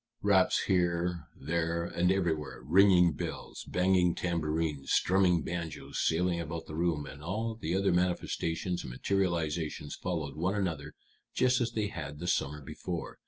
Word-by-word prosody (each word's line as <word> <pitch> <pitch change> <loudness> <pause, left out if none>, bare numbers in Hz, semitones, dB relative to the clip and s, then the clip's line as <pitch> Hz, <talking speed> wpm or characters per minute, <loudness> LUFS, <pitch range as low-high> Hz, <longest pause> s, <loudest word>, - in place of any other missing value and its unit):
Raps 100 -2 +4
here, 85 -3 0
there, 85 +3 -1
and 90 +1 +1
everywhere, 80 -9 -1
ringing 90 +3 +6
bells, - - -6
banging 90 -1 +2
tambourines, 80 -4 -1
strumming 90 -3 +3
banjos 80 -5 -5
sailing 85 +1 +1
about 80 +1 -5
the - - -9
room, 80 -2 0
and 70 +1 -10
all 110 +8 -2
the 90 -6 -3
other 100 0 +2
manifestations 90 -1 0
and - - -7
materializations 80 -2 -1
followed 80 -6 -3
one 90 +6 0
another 80 -8 -2 0.4
just 125 0 +3
as 120 -1 -1
they 105 -2 -1
had 75 -7 -6
the 85 - -6
summer 75 -3 -1
before. 85 +5 -6
85 Hz, 145 wpm, -31 LUFS, 80-95 Hz, 0.4 s, ringing